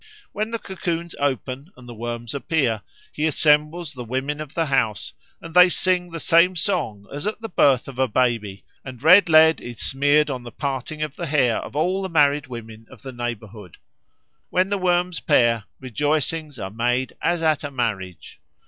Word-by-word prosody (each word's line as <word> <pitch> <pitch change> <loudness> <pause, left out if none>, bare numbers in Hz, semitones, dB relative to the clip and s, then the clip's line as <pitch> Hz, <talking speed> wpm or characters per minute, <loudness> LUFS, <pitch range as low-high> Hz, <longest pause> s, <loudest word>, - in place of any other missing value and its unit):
When 215 +1 -3
the 230 - -3
cocoons 170 -4 -4
open 135 - -3
and 125 -1 -14
the 120 - -8
worms 120 0 -5
appear, 135 -6 0 0.3
he 155 +1 0
assembles 150 +2 +1
the 125 -2 -7
women 130 +5 -3
of 155 0 -9
the 165 - +1
house 125 -7 -1 0.3
and 165 0 -11
they 180 +1 +7
sing 180 0 0
the 165 0 -6
same 170 +4 +4
song 160 - -2
as 145 +6 -4
at 210 - -3
the 225 - -6
birth 135 -7 +3
of 135 -2 -9
a 130 - +3
baby, 105 -5 -1 0.2
and 130 -1 -10
red 180 +3 +7
lead 160 -1 +6
is 120 -2 -9
smeared 145 +2 +2
on 130 -2 -4
the 120 - -9
parting 140 +3 -4
of 150 -1 -6
the 170 - -4
hair 135 -6 +2
of - - -9
all 180 +6 0
the 190 - -4
married 145 -3 +2
women 115 -2 -10
of - - -16
the 135 - -7
neighbourhood. 110 -6 -7 0.7
When 185 +1 +1
the 200 -1 -1
worms 180 -1 +1
pair, 120 -7 +2
rejoicings 150 +3 -2
are 95 -3 -6
made 120 +3 -1
as 175 -1 0
at 155 -2 +2
a 145 - -4
marriage. 105 -9 -4
145 Hz, 185 wpm, -22 LUFS, 120-165 Hz, 0.7 s, they